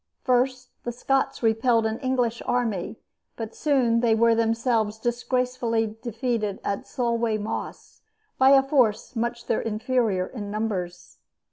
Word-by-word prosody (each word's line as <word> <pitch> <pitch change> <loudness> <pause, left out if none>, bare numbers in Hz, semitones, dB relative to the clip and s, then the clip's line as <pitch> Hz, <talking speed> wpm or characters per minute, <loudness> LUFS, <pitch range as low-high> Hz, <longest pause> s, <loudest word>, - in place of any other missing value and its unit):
First 255 0 +1
the 240 - -3
Scots 265 +2 -1
repelled 225 +1 +3
an 220 +1 -1
English 250 -3 0
army; 230 -6 -1 0.4
but 225 -1 -6
soon 255 -6 +2
they 230 -2 +3
were 230 +1 +4
themselves 225 -1 +1
disgracefully 240 -1 -1
defeated 230 -3 -2
at 200 - -3
Solway 235 -3 0
Moss 210 +1 -6 0.4
by 265 0 +6
a 270 -1 +7
force 255 -4 +1
much 235 +1 -2
their - - 0
inferior 220 -3 0
in 205 -1 -7
numbers. 200 -5 -4
230 Hz, 130 wpm, -25 LUFS, 220-250 Hz, 0.4 s, a